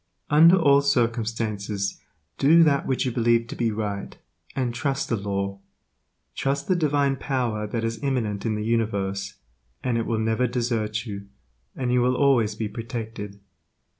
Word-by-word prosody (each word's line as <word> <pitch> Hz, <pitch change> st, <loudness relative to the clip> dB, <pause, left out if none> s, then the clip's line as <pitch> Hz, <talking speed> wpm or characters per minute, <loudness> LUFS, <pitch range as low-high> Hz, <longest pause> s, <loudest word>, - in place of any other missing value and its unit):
Under 165 Hz, +4 st, +7 dB
all 140 Hz, -6 st, +5 dB
circumstances 110 Hz, -6 st, -1 dB, 0.4 s
do 165 Hz, +4 st, +6 dB
that 140 Hz, -3 st, +2 dB
which 130 Hz, 0 st, 0 dB
you 130 Hz, -, 0 dB
believe 115 Hz, -1 st, +2 dB
to -, -, -5 dB
be 120 Hz, -1 st, 0 dB
right, 105 Hz, -2 st, -4 dB, 0.4 s
and 125 Hz, -3 st, -1 dB
trust 135 Hz, +3 st, -2 dB
the 115 Hz, -, +2 dB
Law; 100 Hz, -1 st, -3 dB, 0.7 s
trust 140 Hz, +1 st, -1 dB
the 185 Hz, -, +3 dB
Divine 145 Hz, -4 st, +1 dB
Power 120 Hz, -6 st, -2 dB
that 115 Hz, +2 st, -3 dB
is 115 Hz, 0 st, -3 dB
imminent 115 Hz, -7 st, -1 dB
in 110 Hz, -2 st, 0 dB
the 105 Hz, 0 st, -3 dB
universe, 100 Hz, -3 st, -1 dB, 0.5 s
and 120 Hz, -2 st, 0 dB
it 115 Hz, -, -2 dB
will 115 Hz, -, 0 dB
never 110 Hz, +3 st, +1 dB
desert 115 Hz, -2 st, -1 dB
you, 100 Hz, -3 st, -7 dB, 0.5 s
and 125 Hz, -2 st, -1 dB
you 125 Hz, -, +3 dB
will 125 Hz, +1 st, +2 dB
always 125 Hz, -6 st, +3 dB
be 110 Hz, 0 st, -2 dB
protected. 110 Hz, -2 st, -6 dB
115 Hz, 160 wpm, -25 LUFS, 105-130 Hz, 0.7 s, Under